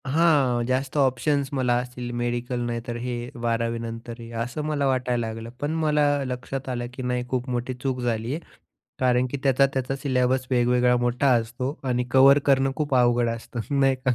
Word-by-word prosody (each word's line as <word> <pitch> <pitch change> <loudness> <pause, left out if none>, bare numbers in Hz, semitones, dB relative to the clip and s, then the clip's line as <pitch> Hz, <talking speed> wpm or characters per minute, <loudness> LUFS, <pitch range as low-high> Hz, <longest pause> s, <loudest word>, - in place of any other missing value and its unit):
हां, 140 -5 +3
जास्त 130 +2 -1
ऑप्शन्स 135 +1 +1
मला 125 -3 +1
असतील. 125 0 -6
मेडिकल 120 +1 -2
नाही 120 0 -2
तर 120 - -3
हे 120 0 -4
12वीनंतर 115 0 -3
हे 115 0 -9
असं 125 +6 -5
मला 150 -2 0
वाटायला 125 -3 0
लागलं. 115 +1 -6
पण 145 +1 -1
मला 145 -2 +2
लक्षात 130 +1 -5
आलं 120 -1 -3
की 130 - -6
"नाही 125 0 -1
खूप 130 0 -2
मोठी 125 +1 -2
चूक 130 -2 -1
झाली 115 -1 -1
आहे." 155 - -3 0.6
कारण 125 0 +2
की 140 - -2
त्याचा, 135 0 +4
त्याचा 130 0 -1
सिलेबस 130 -2 0
वेगवेगळा 125 0 +3
मोठा 120 +3 +2
असतो 125 +4 -4 0.2
आणि 125 0 +1
कव्हर 135 +2 +7
करणं 135 -1 +3
खूप 145 -3 -1
अवघड 120 -1 +3
असतं. 115 +1 -5 0.2
नाही 135 -1 +4
का? 130 0 0
125 Hz, 180 wpm, -25 LUFS, 120-135 Hz, 0.6 s, कव्हर